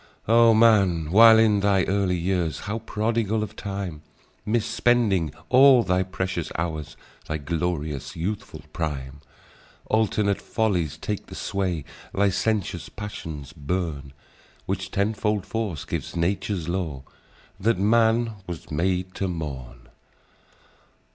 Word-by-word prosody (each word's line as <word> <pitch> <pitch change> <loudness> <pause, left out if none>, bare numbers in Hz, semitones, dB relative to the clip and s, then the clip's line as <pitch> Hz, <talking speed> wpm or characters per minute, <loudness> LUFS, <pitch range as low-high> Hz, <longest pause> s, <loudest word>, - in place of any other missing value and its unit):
"O 115 0 +6
man! 100 -8 +4
while 110 +3 +8
in 110 -2 +4
thy 100 -2 +3
early 95 -2 +1
years, 85 -2 -1
How 105 +2 -3
prodigal 110 0 -1
of 110 - -7
time! 95 -6 -5 0.5
Mis 110 0 +1
spending 105 - +2 0.2
all 130 -1 +7
thy 90 -2 +1
precious 95 -2 -3
hours— 80 -3 -4 0.3
Thy 80 - -2
glorious, 75 -2 -3
youthful 95 +6 -4
prime! 70 -3 -4 0.7
Alternate 105 -2 +1
follies 90 -9 -1
take 105 +5 -4
the - - -10
sway; 90 -6 -2 0.3
Licentious 100 0 0
passions 80 -9 -7
burn; 75 -3 -3 0.5
Which - - -3
tenfold 105 0 0
force 105 -9 -3
gives - - -4
Nature's 90 0 -1
law. 85 -7 -3 0.6
That 110 +1 +2
man 115 +2 +2
was 85 -3 -7
made 90 +4 -1
to 95 - -2
mourn. 70 -8 -6
95 Hz, 115 wpm, -25 LUFS, 80-110 Hz, 0.7 s, while